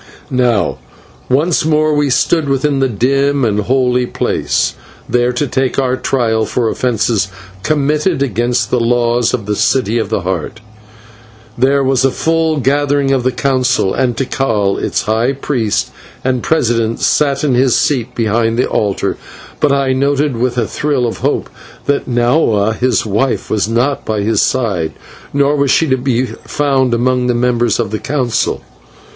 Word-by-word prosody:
Now 125 -5 +1 0.5
once 150 +6 +2
more 155 0 +2
we 145 -1 +1
stood 140 +4 +1
within 135 +1 +1
the 135 -1 +1
dim 135 +4 +1
and 105 -2 0
holy 125 +2 +1
place, - - -1 0.3
there 125 0 +1
to 125 +4 -1
take 130 -1 -1
our 130 -2 +1
trial 115 -4 0
for 120 -2 0
offences 110 -5 0 0.3
committed 150 - 0
against 120 -2 -1
the 125 - +2
laws 120 0 +1
of 115 -5 -3
the 105 0 -1
City 120 0 +1
of 110 - -2
the 110 - -1
Heart. 90 +3 -4 1.0
There 135 +3 +2
was 130 -1 +1
a 135 - +4
full 160 +2 0
gathering 140 +1 +1
of 135 -2 +2
the 130 +1 0
Council, 130 -7 +1
and 125 -3 0
Tikal, 115 -7 0
its - - -1
high 115 +5 +1
priest 125 -6 -1 0.3
and 130 -1 0
president, 115 -7 0
sat 140 -2 +1
in 145 -4 +2
his 125 0 +3
seat 125 -3 -1
behind 115 0 0
the 125 - +1
altar, 100 -2 -1 0.4
but 150 - +2
I 140 -1 +1
noted, 140 +1 +1
with 125 +1 -1
a 120 - +1
thrill 140 +1 -1
of 115 - -3
hope, - - -1 0.4
that 140 -1 -1
Nahua 120 -4 +2
his 125 -1 0
wife 110 +5 -1
was 105 -1 0
not 125 +5 0
by 110 -2 -2
his 105 0 +1
side, 100 -11 0 0.4
nor 140 +1 +2
was 140 -1 +1
she 160 - +3
to 130 - +3
be 125 -1 0
found 130 +1 -1
among 125 +1 +1
the 125 - +1
members 120 -2 +1
of 110 -4 -1
the 110 - -2
Council. 130 -5 -1
125 Hz, 165 wpm, -15 LUFS, 115-140 Hz, 1.0 s, a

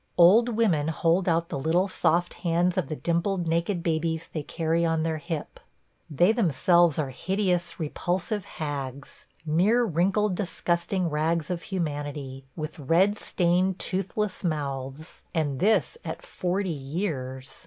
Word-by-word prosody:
Old 205 +8 +7
women 205 -10 +2
hold 170 +3 +2
out 165 +1 +1
the 140 - -3
little 165 +7 +2
soft 175 -2 +1
hands 175 +1 +1
of 185 -7 0
the 155 - -3
dimpled 170 +3 0
naked 170 +2 0
babies 160 -1 -1
they 155 - -2
carry 165 +3 -1
on 165 -1 +1
their 160 -1 -1
hip. 165 -1 -5 0.5
They 175 +7 +4
themselves 175 - +3
are 145 -4 -1
hideous, 180 +4 -1
repulsive 180 +5 -2
hags 140 -3 -5
– - - -35
mere 190 +10 +3
wrinkled, 195 +2 +1
disgusting 175 -1 -1
rags 160 +2 0
of 175 -1 -2
humanity, 145 -6 -4
with 155 -1 -6
red 180 +9 +3
stained, 180 +1 +1
toothless 195 +2 -2
mouths; 145 -2 -4
and 145 -5 0
this 220 - +2
at - - -6
forty 185 +1 -2
years. 135 -4 -4
170 Hz, 140 wpm, -26 LUFS, 155-185 Hz, 0.5 s, Old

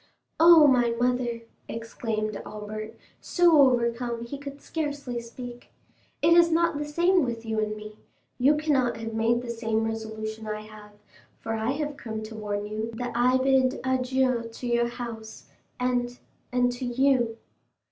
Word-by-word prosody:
"Oh, 330 -1 +9
my 245 -4 +3
mother!" 245 -1 0 0.3
exclaimed 225 -2 -4
Albert, 215 +1 -7 0.2
so 345 -4 +4
overcome 235 -2 +1
he 275 +4 -7
could 280 0 -8
scarcely 285 -7 -4
speak; 240 +1 -10 0.5
"it 335 - +6
is 340 0 +6
not 335 -2 +2
the 295 - -2
same 345 +4 +3
with 230 -2 -4
you 220 -1 -1
and 215 0 -1
me—you 215 +6 -2
cannot 275 -6 +1
have 225 0 -5
made 230 +2 +1
the 240 - -4
same 225 -1 -1
resolution 220 0 -5
I 215 0 -3
have, 215 -1 -13 0.5
for 225 - -4
I 225 +3 0
have 295 0 -3
come 220 -2 -5
to 220 +1 -8
warn 205 -1 -3
you 215 +2 -4
that 245 +2 -4
I 250 +2 +3
bid 260 0 +2
adieu 260 -2 +1
to 235 - -9
your 235 0 +2
house, 230 -2 -8 0.3
and—and 245 0 -1
to 245 +1 -7
you." 245 -2 +2
240 Hz, 150 wpm, -26 LUFS, 225-265 Hz, 0.5 s, Oh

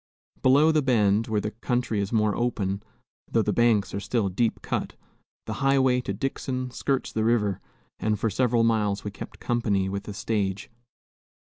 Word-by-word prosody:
Below 145 +5 +5
the 155 -1 +3
bend, 110 -5 +2
where 110 -2 0
the 105 - -3
country 115 -1 -1
is 100 0 -2
more 110 -3 +2
open, 100 -5 -1 0.5
though - - +3
the - - 0
banks 115 -4 +2
are 100 - -2
still 105 -1 0
deep 115 +5 -1
cut, - - -3 0.5
the 110 - -4
highway 130 -2 +3
to 125 - -4
Dixon 130 +3 -3
skirts 135 +1 -1
the 110 - -1
river, 110 -4 +1 0.4
and 105 -1 0
for 110 0 0
several 120 +2 +2
miles 105 -3 +1
we 105 - -4
kept - - -9
company 105 -5 0
with 100 +1 -4
the 105 - -7
stage. 100 -2 -2
110 Hz, 170 wpm, -26 LUFS, 100-125 Hz, 0.5 s, Below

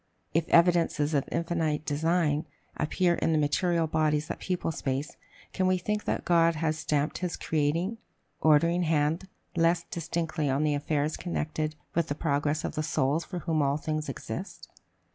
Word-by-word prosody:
If 165 - +1
evidences 170 -3 +4
of 140 -2 0
infinite 165 -3 -1
design 155 0 +1 0.3
appear 175 +3 +1
in 165 - +1
the - - +3
material 165 +3 +2
bodies 155 -1 +1
that - - -4
people 180 -3 -2
space, 135 -1 -3 0.4
can 185 -1 +1
we 185 0 +3
think 210 +4 -2
that - - -1
God 165 -1 +4
has 155 0 -1
stamped 150 0 0
his 180 -2 -3
creating, 165 +8 0 0.4
ordering 165 +3 +4
hand 160 +2 +1 0.3
less 165 0 +3
distinctly 165 -3 -2
on 135 +3 +1
the 150 -1 +2
affairs 150 +1 -1
connected 155 -3 -2 0.2
with 170 -1 +1
the 145 - -2
progress 145 -1 0
of - - -3
the 155 - -1
souls 150 +1 +1
for 180 - -6
whom 160 -3 +1
all 140 0 +2
things 155 0 -3
exist? 190 - -6
160 Hz, 160 wpm, -28 LUFS, 150-170 Hz, 0.4 s, evidences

